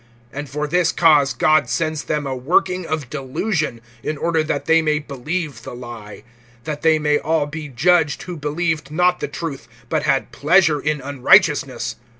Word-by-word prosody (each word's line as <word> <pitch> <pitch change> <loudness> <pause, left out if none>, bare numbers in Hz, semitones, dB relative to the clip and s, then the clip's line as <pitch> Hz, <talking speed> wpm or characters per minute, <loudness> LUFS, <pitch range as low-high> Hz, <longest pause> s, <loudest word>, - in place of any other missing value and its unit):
(11)And 145 0 -6
for 150 +3 -3
this 170 +1 +2
cause 150 -5 +4
God 145 +2 +2
sends 155 -2 -2
them 150 -1 -2
a 135 -1 -3
working 175 +6 0
of 155 -4 -3
delusion, 150 - -2 0.2
in 155 - -3
order 165 +1 +1
that 150 -2 -2
they 165 0 +4
may 150 -1 +1
believe 150 +2 -4
the - - -8
lie; 120 -4 -10 0.4
(12)that 150 -2 -4
they 160 -1 +4
may 150 -1 +1
all 160 -1 0
be 150 +1 -7
judged, 150 +3 +2
who 180 - -6
believed 155 0 -2
not 180 +3 +2
the - - -3
truth, 140 -8 -6 0.2
but 155 -2 0
had 140 -3 0
pleasure 160 0 +3
in 150 -1 -1
unrighteousness. 140 - +2
150 Hz, 170 wpm, -20 LUFS, 140-165 Hz, 0.4 s, cause